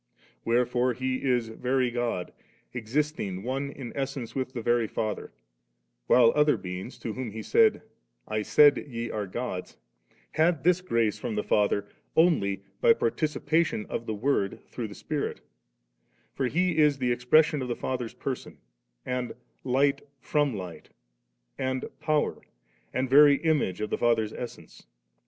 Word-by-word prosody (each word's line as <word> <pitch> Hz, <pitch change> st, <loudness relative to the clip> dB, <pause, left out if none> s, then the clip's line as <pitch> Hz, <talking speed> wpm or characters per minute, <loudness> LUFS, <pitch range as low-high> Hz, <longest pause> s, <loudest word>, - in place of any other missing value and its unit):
Wherefore 125 Hz, +1 st, +2 dB
He 130 Hz, +2 st, -2 dB
is 125 Hz, -4 st, +1 dB
very 125 Hz, +2 st, 0 dB
God, 120 Hz, -7 st, -2 dB, 0.4 s
existing 120 Hz, -5 st, -2 dB
one" 135 Hz, +3 st, -2 dB
in 135 Hz, -4 st, -8 dB
essence 135 Hz, -3 st, -4 dB
with 130 Hz, -1 st, -2 dB
the 120 Hz, -3 st, -5 dB
veiy 120 Hz, -2 st, +2 dB
Father; 110 Hz, -1 st, -3 dB, 0.8 s
while 120 Hz, -2 st, +6 dB
other 150 Hz, 0 st, +4 dB
beings, 90 Hz, +6 st, -7 dB
to 110 Hz, -, -5 dB
whom 130 Hz, -1 st, -4 dB
He 110 Hz, +1 st, -7 dB
said, -, -, +4 dB, 0.2 s
' -, -, -48 dB
I -, -, +1 dB
said 145 Hz, +7 st, +6 dB
ye 115 Hz, -3 st, -4 dB
are 105 Hz, -2 st, -3 dB
GodsS' 95 Hz, -2 st, -5 dB, 0.6 s
had 160 Hz, -2 st, +2 dB
this 180 Hz, +1 st, +3 dB
grace 115 Hz, -, 0 dB
from 110 Hz, -, -3 dB
the 105 Hz, -, -1 dB
Father, 100 Hz, -1 st, +2 dB, 0.3 s
only 100 Hz, -, +3 dB, 0.2 s
by 470 Hz, -2 st, +6 dB
partici 155 Hz, -, -1 dB
pation 160 Hz, -8 st, +1 dB
* -, -, -21 dB
of 115 Hz, -, -4 dB
the 110 Hz, -, -2 dB
Word, 105 Hz, -3 st, 0 dB
through 120 Hz, -3 st, -5 dB
the 100 Hz, -, -10 dB
Spirit 150 Hz, -2 st, -3 dB, 0.9 s
For 130 Hz, -, -1 dB
He 170 Hz, +3 st, +1 dB
is 150 Hz, -2 st, +4 dB
the 125 Hz, -2 st, 0 dB
expression 150 Hz, +5 st, +3 dB
of 130 Hz, -, -3 dB
the 120 Hz, -, -2 dB
Father's 125 Hz, -3 st, -4 dB
Person, 130 Hz, -2 st, -5 dB, 0.5 s
and 125 Hz, -1 st, -3 dB, 0.3 s
Light 140 Hz, +2 st, +2 dB, 0.2 s
from 145 Hz, -1 st, 0 dB
Light, 90 Hz, -4 st, -8 dB, 0.7 s
and 130 Hz, 0 st, -1 dB
Power, 155 Hz, -1 st, 0 dB, 0.5 s
and 130 Hz, +1 st, -1 dB
very 145 Hz, +2 st, +7 dB
Image 150 Hz, -, +1 dB
of 105 Hz, -, -3 dB
the -, -, -1 dB
Father's 115 Hz, -3 st, +2 dB
essence. 120 Hz, -, -9 dB
125 Hz, 155 wpm, -27 LUFS, 110-145 Hz, 0.9 s, very